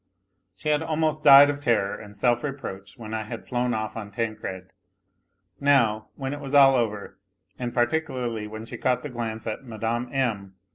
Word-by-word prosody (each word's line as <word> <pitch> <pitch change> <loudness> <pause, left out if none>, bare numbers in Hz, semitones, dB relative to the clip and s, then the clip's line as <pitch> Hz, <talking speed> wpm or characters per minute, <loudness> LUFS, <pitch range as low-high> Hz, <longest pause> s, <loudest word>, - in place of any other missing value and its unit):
She 150 - -4
had 150 0 +2
almost 155 -1 -1
died 140 0 +9
of 145 - -6
terror 105 -7 +1
and 105 -1 -11
self 120 +4 +2
reproach 100 -9 -6
when 110 -2 -8
I 110 - -1
had 110 +2 -7
flown 125 0 0
off 110 0 -3
on 110 -3 -6
Tancred; 105 -4 -5 0.9
now, 120 -7 +3
when 135 0 -4
it 145 - -6
was 140 0 -4
all 135 -1 +8
over, 110 -5 -2 0.4
and 120 -1 -3
particularly 120 -4 -1
when 110 +1 -8
she - - -8
caught 125 -1 +1
iho 145 - -6
glance 115 -2 -4
at 110 +4 -4
Mme. 115 +1 -3
M. 105 -8 -2
120 Hz, 180 wpm, -25 LUFS, 110-135 Hz, 0.9 s, died